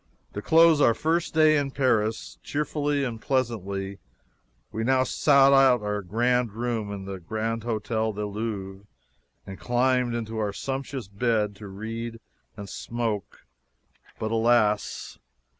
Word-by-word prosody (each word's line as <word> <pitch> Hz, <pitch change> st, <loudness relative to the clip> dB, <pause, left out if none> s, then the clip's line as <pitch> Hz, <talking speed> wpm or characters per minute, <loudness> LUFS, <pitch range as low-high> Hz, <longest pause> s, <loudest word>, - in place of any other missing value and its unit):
To 105 Hz, -, -4 dB
close 165 Hz, +2 st, +5 dB
our 115 Hz, -5 st, +5 dB
first 165 Hz, 0 st, -1 dB
day 155 Hz, -1 st, +5 dB
in 140 Hz, -1 st, 0 dB
Paris 110 Hz, -, 0 dB
cheerfully 145 Hz, -1 st, -1 dB
and 115 Hz, -4 st, -4 dB
pleasantly, 100 Hz, -7 st, -2 dB, 0.7 s
we 110 Hz, -, -3 dB
now 130 Hz, +2 st, +3 dB
sought 140 Hz, 0 st, +4 dB
our 120 Hz, -7 st, +4 dB
grand 120 Hz, +4 st, 0 dB
room 115 Hz, -2 st, -2 dB
in 100 Hz, -1 st, -6 dB
the 95 Hz, -1 st, -6 dB
Grand 110 Hz, +5 st, -3 dB
Hotel 110 Hz, -1 st, -1 dB
du 105 Hz, 0 st, -4 dB
Louvre 100 Hz, -2 st, -5 dB, 0.6 s
and 95 Hz, 0 st, -9 dB
climbed 125 Hz, 0 st, +1 dB
into 110 Hz, -1 st, -4 dB
our 105 Hz, -2 st, -1 dB
sumptuous 135 Hz, -1 st, -4 dB
bed 105 Hz, 0 st, 0 dB
to 105 Hz, -, -9 dB
read 115 Hz, +4 st, -6 dB, 0.4 s
and 100 Hz, -1 st, -7 dB
smoke 115 Hz, -2 st, -4 dB, 0.7 s
but 110 Hz, 0 st, -3 dB
alas! 115 Hz, -2 st, +1 dB
115 Hz, 130 wpm, -26 LUFS, 105-130 Hz, 0.7 s, close